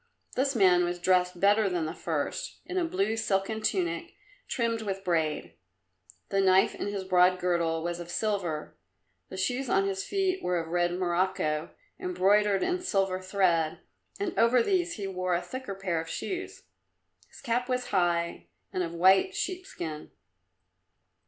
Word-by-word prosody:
This 270 Hz, +1 st, +1 dB
man 180 Hz, -4 st, +5 dB
was 175 Hz, 0 st, -1 dB
dressed 180 Hz, 0 st, +2 dB
better 205 Hz, +1 st, +4 dB
than 175 Hz, -3 st, -1 dB
the 160 Hz, -, -4 dB
first, -, -, -3 dB
in 370 Hz, -, -2 dB
a -, -, +1 dB
blue 370 Hz, -, 0 dB
silken 220 Hz, 0 st, -1 dB
tunic, 185 Hz, -, -1 dB, 0.3 s
trimmed 230 Hz, -2 st, -1 dB
with 195 Hz, -2 st, -4 dB
braid. 160 Hz, -4 st, -1 dB, 0.8 s
The 195 Hz, -, +2 dB
knife 190 Hz, 0 st, +4 dB
in -, -, -4 dB
his 200 Hz, -1 st, -3 dB
broad 185 Hz, 0 st, +4 dB
girdle 170 Hz, -2 st, 0 dB
was 175 Hz, 0 st, -3 dB
of 175 Hz, 0 st, -8 dB
silver, 180 Hz, -6 st, -2 dB, 0.5 s
the 190 Hz, -, -7 dB
shoes 250 Hz, +6 st, -1 dB
on 195 Hz, 0 st, +3 dB
his 195 Hz, -1 st, -2 dB
feet 385 Hz, -1 st, 0 dB
were 180 Hz, 0 st, 0 dB
of 165 Hz, -1 st, -3 dB
red 175 Hz, 0 st, +1 dB
morocco, 175 Hz, -3 st, 0 dB, 0.3 s
embroidered 195 Hz, +2 st, +2 dB
in 360 Hz, 0 st, 0 dB
silver 195 Hz, -, 0 dB
thread, 185 Hz, -4 st, +1 dB, 0.4 s
and 400 Hz, -3 st, -2 dB
over 235 Hz, +1 st, +5 dB
these 350 Hz, 0 st, +1 dB
he 205 Hz, -, -5 dB
wore 185 Hz, -2 st, -1 dB
a 175 Hz, -, 0 dB
thicker 255 Hz, -6 st, -6 dB
pair 185 Hz, -4 st, -1 dB
of 165 Hz, -, -9 dB
shoes. 370 Hz, -, -5 dB, 0.7 s
His -, -, -15 dB
cap 245 Hz, 0 st, -1 dB
was 250 Hz, 0 st, -1 dB
high 170 Hz, -3 st, 0 dB, 0.3 s
and 185 Hz, -, 0 dB
of 170 Hz, -1 st, -3 dB
white 190 Hz, -, +4 dB
sheepskin. 360 Hz, -, -4 dB
190 Hz, 160 wpm, -28 LUFS, 175-230 Hz, 0.8 s, man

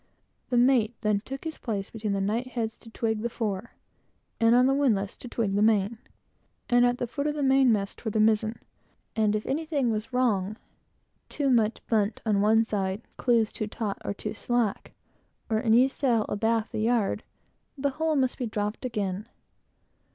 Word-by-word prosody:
The 245 Hz, -, +1 dB
mate 240 Hz, -2 st, +4 dB
then 210 Hz, -2 st, +2 dB
took 270 Hz, +6 st, -7 dB
his 320 Hz, -1 st, -5 dB
place 205 Hz, -5 st, -3 dB
between 215 Hz, -2 st, -3 dB
the 200 Hz, -, 0 dB
knightheads 225 Hz, +2 st, -2 dB
to 230 Hz, -, -14 dB
"twig" 220 Hz, -1 st, -1 dB
the 235 Hz, -, -1 dB
fore, 220 Hz, -2 st, -4 dB, 0.7 s
on 235 Hz, +2 st, +5 dB
the 270 Hz, -, +3 dB
windlass 220 Hz, -9 st, +1 dB
to -, -, -9 dB
twig 225 Hz, -4 st, -1 dB
the 205 Hz, -, +1 dB
main, 215 Hz, 0 st, +2 dB, 0.7 s
and 245 Hz, 0 st, +5 dB
at 245 Hz, 0 st, 0 dB
the 245 Hz, -, -2 dB
foot 280 Hz, +5 st, -3 dB
of 300 Hz, -, -1 dB
the 295 Hz, -, -1 dB
mainmast, 255 Hz, -7 st, +3 dB
for 225 Hz, -, -2 dB
the 215 Hz, -, -1 dB
mizen; 220 Hz, +1 st, +2 dB, 0.6 s
and 215 Hz, -1 st, +2 dB
if 215 Hz, -, -2 dB
anything 285 Hz, -4 st, 0 dB
was 215 Hz, +3 st, -3 dB
wrong, 215 Hz, -5 st, +1 dB, 0.7 s
too 280 Hz, -3 st, 0 dB
much 225 Hz, -2 st, +1 dB
bunt 215 Hz, -1 st, +1 dB
on 205 Hz, -3 st, +2 dB
one 220 Hz, +2 st, +4 dB
side, 200 Hz, 0 st, -2 dB
clews 230 Hz, -3 st, +2 dB
too 215 Hz, -, -3 dB
taut 210 Hz, -1 st, -4 dB
or 200 Hz, -, -3 dB
too -, -, -5 dB
slack, 230 Hz, -1 st, -1 dB, 0.6 s
or 220 Hz, 0 st, +2 dB
any 235 Hz, +3 st, +5 dB
sail 245 Hz, -5 st, +1 dB
abaft 225 Hz, +1 st, 0 dB
the -, -, -2 dB
yard, 225 Hz, -2 st, +1 dB, 0.6 s
the 280 Hz, 0 st, 0 dB
whole 315 Hz, +3 st, 0 dB
must 260 Hz, -3 st, +1 dB
be 250 Hz, -, -1 dB
dropped 210 Hz, +1 st, -3 dB
again. 210 Hz, -4 st, -3 dB
225 Hz, 175 wpm, -27 LUFS, 210-250 Hz, 0.7 s, on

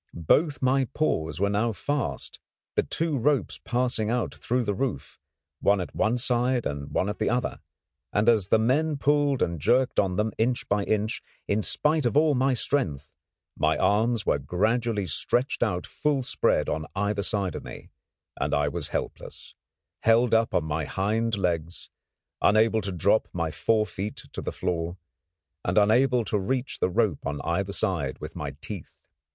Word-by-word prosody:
Both 145 Hz, -, +2 dB
my 130 Hz, +1 st, +3 dB
paws 80 Hz, -, 0 dB
were 100 Hz, -, +2 dB
now 110 Hz, +3 st, +1 dB
fast, 145 Hz, +6 st, -3 dB, 0.3 s
the -, -, +3 dB
two 160 Hz, -4 st, -1 dB
ropes 145 Hz, +3 st, +1 dB
passing 120 Hz, -3 st, 0 dB
out 120 Hz, -1 st, -1 dB
through 125 Hz, +1 st, -1 dB
the 105 Hz, -, -1 dB
roof, 130 Hz, +6 st, -4 dB, 0.4 s
one 100 Hz, 0 st, +3 dB
at 90 Hz, -, -5 dB
one 110 Hz, +2 st, +2 dB
side 125 Hz, 0 st, +1 dB
and 70 Hz, -1 st, -4 dB
one 95 Hz, -, 0 dB
at 105 Hz, -, -4 dB
the 110 Hz, -, +1 dB
other; 125 Hz, +1 st, -1 dB, 0.5 s
and 105 Hz, +2 st, +1 dB
as 110 Hz, -5 st, +4 dB
the 110 Hz, -, +4 dB
men 145 Hz, +7 st, +1 dB
pulled 145 Hz, -1 st, +2 dB
and 85 Hz, -1 st, -2 dB
jerked 125 Hz, -, +2 dB
on 95 Hz, -2 st, +1 dB
them 105 Hz, +2 st, 0 dB
inch 120 Hz, +2 st, 0 dB
by 100 Hz, 0 st, +1 dB
inch, 110 Hz, +1 st, -1 dB, 0.3 s
in 100 Hz, +2 st, +1 dB
spite 150 Hz, +5 st, +1 dB
of 130 Hz, -, 0 dB
all 155 Hz, 0 st, +5 dB
my 130 Hz, 0 st, +2 dB
strength, 90 Hz, -, -2 dB, 0.4 s
my -, -, +1 dB
arms 110 Hz, +1 st, +2 dB
were 70 Hz, -, +2 dB
gradually 105 Hz, -, 0 dB
stretched 120 Hz, -, 0 dB
out 90 Hz, -6 st, 0 dB
full 145 Hz, -3 st, -1 dB
spread -, -, +1 dB
on 80 Hz, +1 st, -2 dB
either 100 Hz, +1 st, 0 dB
side 100 Hz, -4 st, -1 dB
of -, -, -6 dB
me, -, -, -10 dB, 0.4 s
and -, -, -1 dB
I 75 Hz, 0 st, +1 dB
was -, -, -3 dB
helpless, -, -, -6 dB, 0.5 s
held 115 Hz, +2 st, +3 dB
up 115 Hz, 0 st, +3 dB
on 85 Hz, -, +2 dB
my 80 Hz, 0 st, -2 dB
hind 110 Hz, +5 st, 0 dB
legs, 85 Hz, -3 st, -2 dB, 0.5 s
unable 110 Hz, +1 st, +4 dB
to 100 Hz, 0 st, -3 dB
drop 95 Hz, +5 st, +2 dB
my 85 Hz, -2 st, -1 dB
fore 110 Hz, +7 st, +1 dB
feet 100 Hz, +2 st, -5 dB, 0.2 s
to -, -, -4 dB
the -, -, -3 dB
floor, 85 Hz, -1 st, -2 dB, 0.7 s
and -, -, -1 dB
unable 120 Hz, +3 st, +4 dB
to 105 Hz, +1 st, 0 dB
reach 130 Hz, +7 st, -2 dB
the -, -, +2 dB
rope 95 Hz, -4 st, 0 dB
on 70 Hz, 0 st, -3 dB
either 95 Hz, +4 st, -1 dB
side 80 Hz, -9 st, -1 dB
with -, -, -8 dB
my -, -, -5 dB
teeth. -, -, -7 dB
110 Hz, 175 wpm, -26 LUFS, 95-125 Hz, 0.7 s, all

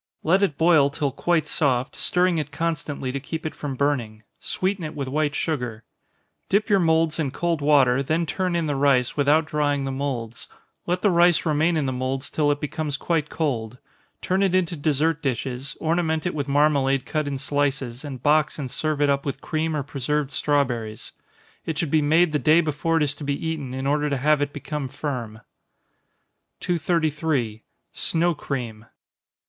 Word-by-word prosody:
Let 185 Hz, +5 st, +3 dB
it 160 Hz, -8 st, +1 dB
boil 160 Hz, -4 st, +5 dB
till 145 Hz, -1 st, -2 dB
quite 165 Hz, +4 st, +1 dB
soft, 130 Hz, -4 st, 0 dB
stirring 180 Hz, -2 st, +2 dB
it 150 Hz, -1 st, -4 dB
constantly 150 Hz, -4 st, -3 dB
to 140 Hz, -, -3 dB
keep 160 Hz, +4 st, -6 dB
it 155 Hz, -, -3 dB
from 140 Hz, -3 st, -5 dB
burning 125 Hz, -6 st, -1 dB, 0.2 s
sweeten 190 Hz, -1 st, -2 dB
it 155 Hz, -, -5 dB
with 140 Hz, -2 st, -3 dB
white 150 Hz, +2 st, 0 dB
sugar. 125 Hz, -8 st, -2 dB, 0.7 s
Dip 205 Hz, +2 st, +2 dB
your 200 Hz, -, +5 dB
moulds 160 Hz, -2 st, +2 dB
in 150 Hz, -4 st, 0 dB
cold 170 Hz, +2 st, -1 dB
water, 135 Hz, -3 st, +4 dB
then 160 Hz, +5 st, 0 dB
turn 180 Hz, +2 st, -1 dB
in 170 Hz, -1 st, 0 dB
the 145 Hz, -2 st, -1 dB
rice, 135 Hz, -3 st, +2 dB
without 150 Hz, +2 st, +3 dB
drying 145 Hz, -2 st, 0 dB
the 135 Hz, -, -2 dB
moulds. 130 Hz, -4 st, -4 dB, 0.4 s
Let 180 Hz, +1 st, -1 dB
the 205 Hz, -, +4 dB
rice 175 Hz, 0 st, +4 dB
remain 160 Hz, +2 st, +2 dB
in 150 Hz, -, 0 dB
the 130 Hz, -, -1 dB
moulds 130 Hz, +2 st, -3 dB
till 150 Hz, -2 st, +1 dB
it 145 Hz, 0 st, +1 dB
becomes 150 Hz, -1 st, -3 dB
quite 160 Hz, -2 st, -1 dB
cold. 125 Hz, -7 st, -2 dB, 0.5 s
Turn 185 Hz, +2 st, +1 dB
it 190 Hz, -2 st, +2 dB
into 180 Hz, -2 st, +1 dB
dessert 155 Hz, +1 st, 0 dB
dishes, 130 Hz, +1 st, -3 dB
ornament 160 Hz, -1 st, 0 dB
it 175 Hz, -, -1 dB
with 145 Hz, -2 st, -3 dB
marmalade 140 Hz, -2 st, +2 dB
cut 155 Hz, -2 st, -2 dB
in 140 Hz, -1 st, -2 dB
slices, 135 Hz, -2 st, -1 dB
and 135 Hz, -4 st, -7 dB
box 150 Hz, 0 st, +3 dB
and 135 Hz, -4 st, -5 dB
serve 155 Hz, -2 st, -1 dB
it 145 Hz, -, +3 dB
up 140 Hz, 0 st, 0 dB
with 135 Hz, -1 st, -4 dB
cream 155 Hz, +1 st, -2 dB
or 145 Hz, -, -1 dB
preserved 145 Hz, +1 st, -2 dB
strawberries. 125 Hz, -7 st, -1 dB, 0.5 s
It 160 Hz, -2 st, -4 dB
should 160 Hz, -3 st, -1 dB
be 155 Hz, -, +4 dB
made 160 Hz, +3 st, +3 dB
the 150 Hz, -, +1 dB
day 155 Hz, +3 st, +5 dB
before 160 Hz, +1 st, 0 dB
it 160 Hz, -, +3 dB
is 145 Hz, -1 st, 0 dB
to 150 Hz, -, -10 dB
be 140 Hz, +3 st, -2 dB
eaten, 150 Hz, -5 st, -3 dB
in 135 Hz, 0 st, -4 dB
order 150 Hz, +1 st, +1 dB
to 140 Hz, -, 0 dB
have 150 Hz, +2 st, +2 dB
it 145 Hz, 0 st, -1 dB
become 145 Hz, -1 st, -4 dB
firm. 120 Hz, -6 st, -5 dB, 1.2 s
233. 155 Hz, -9 st, 0 dB, 0.3 s
_Snow 170 Hz, 0 st, +1 dB
Cream. 115 Hz, -7 st, -5 dB
145 Hz, 185 wpm, -24 LUFS, 135-160 Hz, 1.2 s, boil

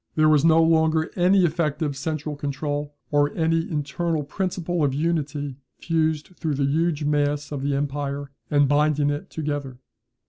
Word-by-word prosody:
There 155 Hz, 0 st, +4 dB
was 150 Hz, -2 st, +4 dB
no 165 Hz, 0 st, +5 dB
longer 160 Hz, -1 st, +2 dB
any 185 Hz, +1 st, +4 dB
effective 155 Hz, -3 st, -1 dB
central 150 Hz, +1 st, -3 dB
control, 145 Hz, +1 st, -3 dB, 0.2 s
or 145 Hz, 0 st, +3 dB
any 165 Hz, 0 st, +1 dB
internal 155 Hz, +1 st, -1 dB
principle 175 Hz, +1 st, -2 dB
of 135 Hz, -2 st, +1 dB
unity 145 Hz, -3 st, -2 dB, 0.2 s
fused 160 Hz, 0 st, -1 dB
through 155 Hz, -4 st, -1 dB
the 140 Hz, 0 st, +1 dB
huge 155 Hz, +2 st, 0 dB
mass 145 Hz, 0 st, 0 dB
of 145 Hz, -2 st, -3 dB
the 140 Hz, 0 st, 0 dB
empire, 140 Hz, 0 st, -3 dB, 0.2 s
and 145 Hz, -1 st, +4 dB
binding 145 Hz, 0 st, +2 dB
it 145 Hz, +1 st, -5 dB
together. 145 Hz, -4 st, -4 dB
150 Hz, 150 wpm, -24 LUFS, 145-160 Hz, 0.2 s, no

